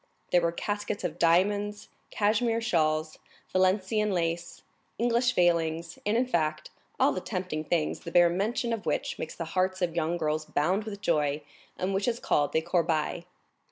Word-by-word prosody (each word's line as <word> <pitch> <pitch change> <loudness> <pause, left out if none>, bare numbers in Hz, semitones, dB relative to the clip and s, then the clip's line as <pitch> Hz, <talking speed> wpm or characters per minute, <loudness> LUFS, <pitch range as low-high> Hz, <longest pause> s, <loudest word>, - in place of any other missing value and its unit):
There 175 - +5
were 170 0 +1
caskets 205 +3 -3
of - - -3
diamonds, 205 +5 +2 0.2
cashmere 225 +2 +1
shawls, 155 -8 0 0.3
Valenciennes 190 +3 +2
lace, 170 -1 -2 0.3
English 240 +1 +2
veils, 165 -1 +1
and 215 +2 +2
in 250 - +2
fact 155 -9 -1 0.3
all - - +5
the 185 - -3
tempting 180 -6 -3
things, 160 -1 0
the 170 - -8
bare 175 0 +5
mention 225 +6 -1
of 225 - -5
which - - -1
makes 155 - -5
the 165 - -4
hearts 185 0 +1
of 175 -2 -1
young 170 +1 0
girls 155 -1 -1
bound 185 +10 0
with 200 -2 -7
joy, 150 -5 +1 0.3
and 190 +2 -1
which 195 +3 0
is 235 -1 0
called 145 -1 +1
the 160 - +2
corbeille. 170 -1 0
180 Hz, 165 wpm, -28 LUFS, 165-205 Hz, 0.3 s, There